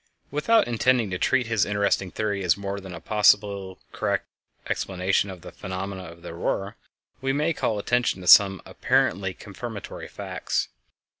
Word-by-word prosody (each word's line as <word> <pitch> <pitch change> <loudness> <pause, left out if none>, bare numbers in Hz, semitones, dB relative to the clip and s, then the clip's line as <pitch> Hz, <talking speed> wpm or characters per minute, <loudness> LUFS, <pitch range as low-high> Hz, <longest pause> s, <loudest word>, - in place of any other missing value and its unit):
Without 185 - +3
intending 120 -2 +2
to 90 - -2
treat 130 +3 +2
his 110 -4 +1
interesting 100 -2 0
theory 100 0 -2
as 90 0 +3
more 100 0 -4
than 95 -2 -9
a - - -7
possibly 100 0 +2
correct - - -1 0.4
explanation 95 +1 0
of 95 -2 -9
the - - -10
phenomena 95 0 -5
of 85 0 -12
the 85 - -7
Aurora, 95 +5 -2 0.5
we 135 0 0
may 150 +4 +1
call 110 -8 -1
attention 120 -1 0
to 90 - -8
some 95 0 +7
apparently 95 -1 0
confirmatory 105 +1 -8
facts. - - -3
100 Hz, 155 wpm, -25 LUFS, 95-115 Hz, 0.5 s, some